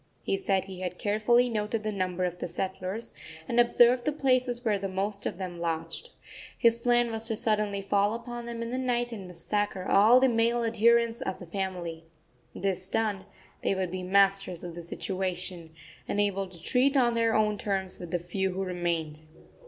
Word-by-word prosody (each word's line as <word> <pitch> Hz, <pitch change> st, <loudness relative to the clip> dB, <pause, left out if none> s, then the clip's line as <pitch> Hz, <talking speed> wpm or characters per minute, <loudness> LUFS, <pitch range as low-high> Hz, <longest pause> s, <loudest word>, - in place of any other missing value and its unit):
He -, -, 0 dB
said 195 Hz, -1 st, 0 dB
he 190 Hz, -2 st, -9 dB
had 180 Hz, -1 st, -4 dB
carefully 220 Hz, +4 st, +3 dB
noted 215 Hz, -1 st, -2 dB
the 215 Hz, -, -1 dB
number 185 Hz, -2 st, -2 dB
of 180 Hz, 0 st, -4 dB
the -, -, -3 dB
settlers, 190 Hz, +4 st, -4 dB, 0.3 s
and 235 Hz, -, +1 dB
observed 240 Hz, +1 st, +5 dB
the 300 Hz, -, +1 dB
places 255 Hz, -4 st, +1 dB
where 210 Hz, -3 st, +2 dB
the 195 Hz, -, -2 dB
most 195 Hz, +2 st, -2 dB
of -, -, -4 dB
them 180 Hz, -2 st, -5 dB
lodged. 165 Hz, -, -3 dB, 0.5 s
His 230 Hz, 0 st, +4 dB
plan 240 Hz, 0 st, +3 dB
was 225 Hz, 0 st, -2 dB
to 225 Hz, -, 0 dB
suddenly 210 Hz, -2 st, +1 dB
fall 200 Hz, +2 st, +2 dB
upon 240 Hz, 0 st, -6 dB
them 230 Hz, -1 st, -4 dB
in 230 Hz, -, -5 dB
the 255 Hz, -, -1 dB
night 240 Hz, -1 st, 0 dB
and 200 Hz, -5 st, -7 dB
massacre 185 Hz, +2 st, -2 dB
all 220 Hz, +5 st, +6 dB
the 265 Hz, -, +5 dB
male 235 Hz, 0 st, +2 dB
adherents 230 Hz, +1 st, +3 dB
of 190 Hz, -, -3 dB
the 180 Hz, -, -9 dB
family. 175 Hz, -3 st, -4 dB, 0.5 s
This 190 Hz, -1 st, -2 dB
done, 205 Hz, -3 st, -1 dB, 0.3 s
they -, -, +1 dB
would 185 Hz, -2 st, -2 dB
be 185 Hz, 0 st, -4 dB
masters 195 Hz, -1 st, +2 dB
of 175 Hz, -1 st, -6 dB
the 170 Hz, -, -7 dB
situation, 180 Hz, -1 st, -4 dB, 0.4 s
and 205 Hz, -, -1 dB
able 195 Hz, -1 st, +1 dB
to 180 Hz, -2 st, -13 dB
treat 270 Hz, +5 st, +3 dB
on 240 Hz, -2 st, +4 dB
their 230 Hz, -1 st, +2 dB
own 210 Hz, -1 st, +2 dB
terms 195 Hz, -3 st, -2 dB
with 175 Hz, -, -7 dB
the 175 Hz, -, 0 dB
few 185 Hz, +2 st, -2 dB
who 190 Hz, +1 st, -2 dB
remained. 170 Hz, -4 st, -2 dB
200 Hz, 190 wpm, -28 LUFS, 185-235 Hz, 0.5 s, all